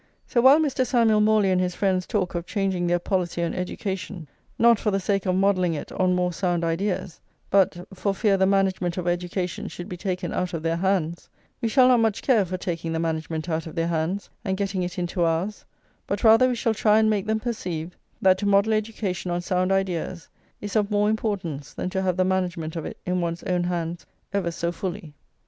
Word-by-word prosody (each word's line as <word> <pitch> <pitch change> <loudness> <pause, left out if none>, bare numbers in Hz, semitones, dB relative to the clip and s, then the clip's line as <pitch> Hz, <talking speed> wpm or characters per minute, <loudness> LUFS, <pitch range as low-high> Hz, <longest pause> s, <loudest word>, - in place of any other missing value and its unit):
So 240 - +1
while 265 +4 +8
Mr. 275 -4 +1
Samuel 230 -4 +3
Morley 210 -2 +3
and 185 0 +2
his 180 -1 -1
friends 185 -2 0
talk 200 -6 -1
of 170 0 -4
changing 190 -4 -1
their 175 0 +3
policy 175 -1 -1
on 170 - -1
education, 185 -1 -4 0.3
not 235 -2 +5
for 215 - 0
the 195 -1 +1
sake 195 0 -1
of 185 - +2
modelling 185 -3 +2
it 145 - -6
on 185 -1 +1
more 180 0 0
sound 175 -2 0
ideas, 180 +1 -2 0.3
but 185 -2 +2
"for 200 +1 -1
fear 205 -1 +2
the 190 0 +3
management 190 -3 +1
of 180 -1 -3
education 175 +1 -2
should 175 - -7
be 180 - -6
taken 180 -1 -3
out 180 -1 -2
of 160 - -5
their 165 0 0
hands," 175 -2 -1 0.3
we 230 - +1
shall 255 +2 +5
not 250 -2 +5
much 225 -3 +1
care 235 -7 +4
for 185 +1 -4
taking 165 -2 -3
the 160 - -1
management 160 0 -2
out 160 -1 -2
of 160 - -9
their 165 0 0
hands 170 +4 -1 0.2
and 190 -3 -1
getting 195 -1 -1
it 180 -1 -4
into 175 0 -2
ours; 170 +5 -1 0.4
but 200 0 -2
rather 225 +3 +7
we 250 - 0
shall 230 -1 0
try 215 0 +3
and 220 0 +4
make 210 -1 0
them 220 0 +1
perceive, 180 -8 -4 0.3
that 185 -1 +5
to 205 - -1
model 200 +2 +4
education 210 -4 -2
on 175 0 0
sound 185 +1 0
ideas 185 -3 -1 0.3
is 205 +1 -5
of 210 -2 +2
more 210 0 +2
importance 185 -10 -3
than 180 - -3
to 190 - -1
have 185 -2 0
the 185 - +3
management 180 -4 -1
of 165 - -4
it - - -8
in 180 0 0
one's 170 0 -3
own 180 -2 0
hands 170 -1 -3 0.3
ever 195 -4 0
so 170 0 -2
fully. 175 -2 -5
185 Hz, 215 wpm, -25 LUFS, 175-205 Hz, 0.4 s, while